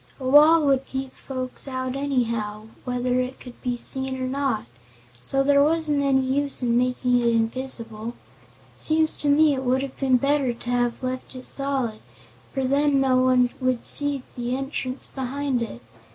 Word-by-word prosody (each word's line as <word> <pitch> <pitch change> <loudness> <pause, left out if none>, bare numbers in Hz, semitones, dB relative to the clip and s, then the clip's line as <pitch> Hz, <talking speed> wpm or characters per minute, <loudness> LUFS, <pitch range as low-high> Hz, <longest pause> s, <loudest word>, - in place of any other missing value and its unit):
"A 260 - -4
wall 300 +3 +6
would 270 -1 +2
keep 265 0 -5
folks 255 0 -4
out 255 -1 -3
anyhow, 230 -6 -2 0.2
whether 250 0 0
it 255 +1 -3
could 250 -2 -12
be 245 -2 -2
seen 265 +1 -1
or 255 - -2
not, 270 - -1 0.6
so 270 - 0
there 280 0 +4
wasn't 305 -2 +1
any 270 -1 +3
use 270 +1 +1
making 250 +1 +1
it 235 - +1
invisible. 230 -1 -1 0.6
Seems 315 0 +2
to 290 - +1
me 300 +1 +5
it 265 -1 -3
would 260 +1 +1
have 270 -1 -8
been 265 -2 +3
better 275 -1 +1
to 240 - -9
have 245 0 0
left 255 +1 -4
it 255 - -8
solid, 270 -6 -1 0.5
for 270 - -2
then 280 +1 +2
no 265 -1 +3
one 255 -1 +3
would 255 -1 +1
have 235 - -14
seen 285 -2 +3
the 245 +1 -2
entrance 270 -1 -2
behind 265 -1 -3
it. 125 - -6
260 Hz, 170 wpm, -24 LUFS, 245-275 Hz, 0.6 s, wall